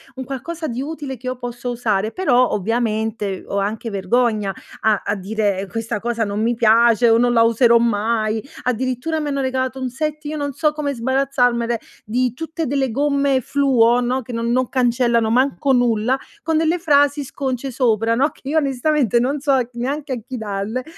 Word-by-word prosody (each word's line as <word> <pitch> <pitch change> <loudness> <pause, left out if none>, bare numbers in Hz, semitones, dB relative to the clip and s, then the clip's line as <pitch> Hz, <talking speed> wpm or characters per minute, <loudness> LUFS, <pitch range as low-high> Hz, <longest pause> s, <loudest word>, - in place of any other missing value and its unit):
un 260 - -5
qualcosa 310 +6 -5
di 245 0 -3
utile 290 -2 -5
che 255 +1 -10
io 255 0 -3
posso 245 0 -5
usare. 220 -3 -1
Però 255 -8 +2
ovviamente 220 -2 -1
ho 200 - -2
anche 215 +3 -3
vergogna 210 +1 +1 0.3
a 215 -2 +2
a 205 - 0
dire: 200 0 -1
"Questa 225 +2 -3
cosa 235 +1 -1
non 205 +1 -3
mi 235 +2 +1
piace" 230 +1 +4
o 225 - +5
"Non 245 0 +3
la 230 -1 +5
userò 235 +1 +5
mai". 220 -1 0 0.2
Addirittura 255 +5 -1
mi 300 - -3
hanno 280 -1 -1
regalato 260 0 -2
un 260 -1 -2
set, 305 +3 -4
io 300 +1 -3
non 285 -1 -3
so 305 +3 +1
come 300 -2 -3
sbarazzarmene, 245 -2 +1 0.2
di 245 +2 0
tutte 325 +4 -4
delle 270 -1 0
gomme 280 +1 +1
fluo, 245 -3 +3
no, 250 +2 0
che 245 - -9
non 230 0 -1
non 255 0 +1
cancellano 240 -3 +2
manco 270 +4 +2
nulla, 245 0 +2 0.2
con 320 0 0
delle 325 +2 +1
frasi 290 -2 +3
sconce 270 -1 -4
sopra, 230 -3 +1
no, 275 +5 +2
che - - -24
io 315 - +1
onestamente 275 -4 +1
non 270 +5 0
so 280 0 +1
c - - -25
neanche 270 +4 -3
a 250 - -3
chi 255 -1 -6
dalle, 215 +3 -3
245 Hz, 185 wpm, -20 LUFS, 225-275 Hz, 0.3 s, o